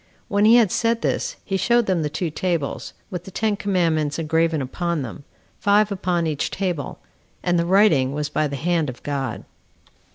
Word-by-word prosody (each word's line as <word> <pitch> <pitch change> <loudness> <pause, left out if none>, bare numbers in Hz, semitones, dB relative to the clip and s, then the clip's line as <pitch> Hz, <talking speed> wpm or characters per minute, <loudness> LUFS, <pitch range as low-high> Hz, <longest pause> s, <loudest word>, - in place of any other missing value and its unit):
When 205 +1 +3
he 225 +2 +7
had 225 -6 +5
said 230 0 +1
this, - - -1
he 195 - -1
showed 235 +5 +3
them 185 -4 +1
the 150 - -1
two 165 +2 -3
tables, 170 -3 -2 0.2
with 180 -2 -5
the - - -8
ten 215 +2 0
commandments 165 -7 0
engraven 165 0 +1
upon 165 +4 -2
them, 135 +4 -8 0.3
five 205 +1 +3
upon 180 -3 0
each 155 -3 -1
table; 180 -8 -3 0.5
and 175 -1 +2
the 170 - 0
writing 175 -9 +4
was 150 +1 -2
by 155 +1 0
the 140 - -5
hand 160 +1 0
of 125 - -9
God. 140 -2 -3
170 Hz, 185 wpm, -22 LUFS, 150-195 Hz, 0.5 s, he